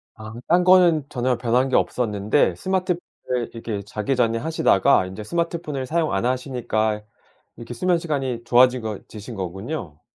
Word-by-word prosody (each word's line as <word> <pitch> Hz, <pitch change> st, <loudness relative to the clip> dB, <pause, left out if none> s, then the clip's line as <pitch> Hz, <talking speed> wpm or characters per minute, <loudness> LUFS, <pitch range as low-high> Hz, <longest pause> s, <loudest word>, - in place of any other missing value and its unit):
아 110 Hz, 0 st, -9 dB
딴 175 Hz, +2 st, +4 dB
거는 175 Hz, -5 st, +5 dB
전혀 125 Hz, 0 st, 0 dB
변한 125 Hz, +2 st, +1 dB
게 130 Hz, -, 0 dB
없었는데 105 Hz, -5 st, +1 dB
스마트폰을 180 Hz, -, -3 dB
이렇게 115 Hz, -3 st, -4 dB
자기 105 Hz, +6 st, -2 dB
전에 115 Hz, -2 st, +1 dB
하시다가 115 Hz, -10 st, +3 dB
인제 95 Hz, +3 st, -7 dB
스마트폰을 165 Hz, 0 st, -3 dB
사용 160 Hz, +2 st, 0 dB
안 95 Hz, +4 st, 0 dB
하시니까 120 Hz, -4 st, -1 dB, 0.5 s
이렇게 120 Hz, +1 st, -8 dB
수면 175 Hz, +9 st, +1 dB
시간이 135 Hz, -8 st, -3 dB
좋아지거 120 Hz, -3 st, +3 dB
지신 110 Hz, +2 st, -9 dB
거군요. 95 Hz, -, -6 dB
125 Hz, 355 characters per minute, -22 LUFS, 110-155 Hz, 0.5 s, 거는